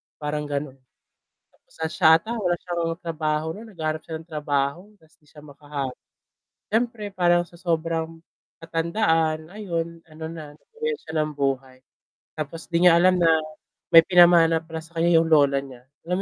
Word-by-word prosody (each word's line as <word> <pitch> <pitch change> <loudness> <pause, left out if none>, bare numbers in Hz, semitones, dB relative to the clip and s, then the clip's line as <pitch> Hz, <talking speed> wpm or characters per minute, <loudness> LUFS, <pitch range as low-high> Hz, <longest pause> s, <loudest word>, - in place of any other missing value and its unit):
parang 150 0 -4
gano’n. 140 -2 -4 0.7
Tapos - - -30 0.2
siya 160 0 +5
ata 225 +7 -5
wala 180 -4 +1
siyang 170 -2 -2
trabaho, 155 -2 -2
naghahanap 160 -8 -4
siya 160 - -6
ng 165 - -27
trabaho 145 0 -1 0.2
tapos 160 - -25
hindi 150 - -31
siya 150 0 -16
makahanap. 145 -2 -6 0.7
Siyempre 230 0 -1
parang 175 -1 +3
sa 170 - -17
sobrang 165 -1 -2 0.4
katandaan 165 -2 0
ayon, 170 -5 -4
ano 160 +1 -9
na, 155 -3 -9
nabawian 460 - -5
siya - - -10
ng 155 - -5
buhay. 135 -2 -2 0.6
Tapos 155 +2 -6
'di 170 +1 +2
niya 170 - +5
alam 185 0 +4
na 165 - +5 0.6
may 165 - +11
pinamana 170 -3 +5
pala 160 0 -8
sa 165 +1 -18
kaniya 170 0 +4
yung - - -1
lola 140 -3 +4
niya. 130 -3 -12 0.2
Alam 180 +2 -1
165 Hz, 155 wpm, -24 LUFS, 150-175 Hz, 0.7 s, may